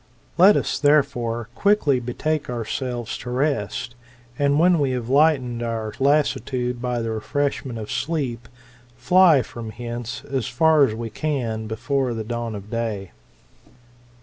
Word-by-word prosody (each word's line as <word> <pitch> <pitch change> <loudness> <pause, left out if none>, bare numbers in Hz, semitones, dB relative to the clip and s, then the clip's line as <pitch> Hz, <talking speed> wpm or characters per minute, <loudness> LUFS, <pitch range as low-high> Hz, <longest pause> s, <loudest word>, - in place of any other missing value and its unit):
Let 190 +4 +7
us, - - -1
therefore, 120 -6 +1
quickly 200 -10 +2
betake 145 +5 -2
ourselves 120 0 -4
to 125 - -7
rest, 125 -4 -1 0.5
and 140 0 +3
when 175 0 +4
we 135 -3 +1
have 120 -1 -6
lightened 135 -4 +3
our 115 -2 -3
lassitude 130 -3 +1
by 125 -2 -1
the 115 - -2
refreshment 130 +2 -2
of 110 -1 -6
sleep, 135 -7 -2 0.5
fly 160 +1 +5
from 115 -1 -8
hence 120 0 -6
as 130 -5 -3
far 155 +2 +4
as 110 - -3
we 115 0 -5
can 120 -8 -2
before 125 +3 -1
the 110 - -3
dawn 115 0 -4
of 100 +1 -9
day. 110 -5 -3
125 Hz, 140 wpm, -23 LUFS, 115-145 Hz, 0.5 s, Let